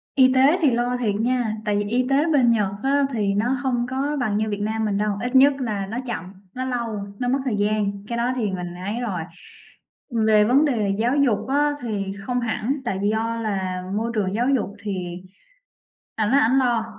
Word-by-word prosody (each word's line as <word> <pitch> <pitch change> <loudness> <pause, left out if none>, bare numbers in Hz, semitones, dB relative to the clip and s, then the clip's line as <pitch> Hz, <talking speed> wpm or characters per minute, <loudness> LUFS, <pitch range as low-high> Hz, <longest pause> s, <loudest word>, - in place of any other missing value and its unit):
Y 260 -1 +5
tế 270 +6 +5
thì 295 -5 +4
lo 245 +1 0
thiệt 220 -5 0
nha, 235 0 0
tại 205 -1 +1
vì 205 - 0
y 245 +4 0
tế 280 +3 +3
bên 255 -5 +4
Nhật 210 -4 +2
á 280 +1 +3
thì 205 -4 0
nó 210 +4 0
hông 260 -3 -1
có 280 +3 -1
bằng 215 -5 0
như 215 0 0
Việt 205 -1 -3
Nam 220 +1 -1
mình 205 -2 0
đâu, 210 0 0
ít 250 +2 -2
nhất 275 +2 +7
là 210 -5 -2
nó 220 +4 -5
chậm, 190 -6 -5 0.2
nó 255 +1 -3
lâu, 235 -4 -2 0.2
nó 245 - -1
mất 265 +3 +1
thời 245 -5 0
gian, 205 0 +1 0.2
cái 235 - -3
đó 240 +2 +1
thì 220 -6 -1
mình 180 -2 -5
ấy 200 +6 -4
rồi. 195 -8 -2 1.1
Về 215 -1 +5
vấn 265 +7 +4
đề 215 -8 0
giáo 245 +5 +1
dục 250 -7 +2
á 290 +2 +2
thì 200 -5 -3
không 245 +5 -1
hẳn, 235 +3 -1
tại 190 -4 -2
do 225 +1 -1
là 190 -4 -2
môi 230 +2 -1
trường 195 -3 0
giáo 235 +4 0
dục 205 -5 -2
thì 180 -4 -4 0.9
ảnh 215 0 0
nói 275 - +5
ảnh 250 +1 +3
lo. 240 -3 +1
230 Hz, 215 wpm, -23 LUFS, 205-255 Hz, 1.1 s, nhất